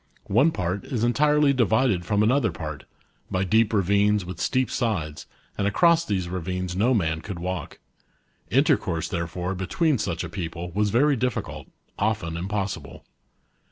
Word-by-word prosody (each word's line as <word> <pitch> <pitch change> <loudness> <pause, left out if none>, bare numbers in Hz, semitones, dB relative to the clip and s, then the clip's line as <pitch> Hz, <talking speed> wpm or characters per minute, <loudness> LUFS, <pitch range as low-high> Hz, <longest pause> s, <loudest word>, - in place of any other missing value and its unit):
One 135 +9 +5
part 90 - -2
is 120 -6 -2
entirely 150 +3 +3
divided 110 -6 +2
from 105 -1 +2
another 120 0 +2
part, 75 -2 -7 0.4
by 95 0 0
deep 110 +3 +3
ravines 100 0 +2
with 90 -1 -7
steep 130 -1 +1
sides, 85 - -2 0.3
and 100 - +2
across 170 - +4
these 95 - -2
ravines 90 0 -3
no 120 +7 +3
man 80 -5 0
could 95 0 -6
walk. 90 -1 -4 0.7
Intercourse, 80 -1 +2
therefore, 90 +1 -3
between 125 - 0
such 85 -4 -2
a - - -4
people 85 -2 -5
was 105 +3 +1
very 140 +7 +3
difficult, 125 +1 -3 0.3
often 100 -6 -1
impossible. 95 -3 -4
100 Hz, 145 wpm, -25 LUFS, 90-120 Hz, 0.7 s, One